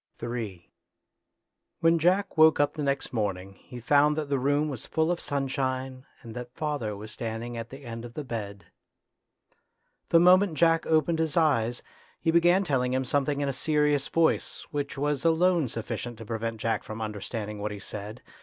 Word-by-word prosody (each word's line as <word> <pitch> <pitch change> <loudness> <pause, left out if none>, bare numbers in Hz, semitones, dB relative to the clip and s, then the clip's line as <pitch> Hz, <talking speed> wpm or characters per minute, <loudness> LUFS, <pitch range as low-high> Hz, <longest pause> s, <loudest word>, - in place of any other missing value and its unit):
Ill 115 -4 -4 1.3
When 165 0 +4
Jack 185 +4 +2
woke 155 -2 +6
up 145 - +2
the 155 - -5
next 140 -2 -1
morning 100 -4 -2
he 125 - -10
found 145 +4 +4
that 150 -2 -3
the 140 -1 +1
room 145 +3 +1
was 135 -6 -5
full 160 +1 +1
of 175 - -1
sunshine, 130 -1 -2 0.2
and 115 - -9
that 125 +1 -8
father 145 -9 -2
was 105 +2 -8
standing 115 +1 -5
at 115 0 -6
the 135 +2 -11
end 115 -1 -6
of 120 0 -10
the 150 - -4
bed. 100 -7 -6 1.4
The 165 - +6
moment 180 0 +5
Jack 165 0 +3
opened 160 +1 +2
his 160 0 -1
eyes, 120 -7 +2 0.4
he 165 - +1
began 175 +3 +4
telling 130 -6 0
him 130 0 0
something 145 +2 0
in 140 - 0
a 140 - -1
serious 150 0 +1
voice, 165 +1 +1
which 145 -1 -3
was 145 -1 -1
alone 165 -1 +3
sufficient 115 +1 -5
to 115 - -9
prevent 115 0 -3
Jack 110 -1 0
from 110 +1 -7
understanding 105 0 -5
what 105 - -1
he 105 - -6
said. 105 +3 -7
135 Hz, 180 wpm, -27 LUFS, 115-155 Hz, 1.4 s, woke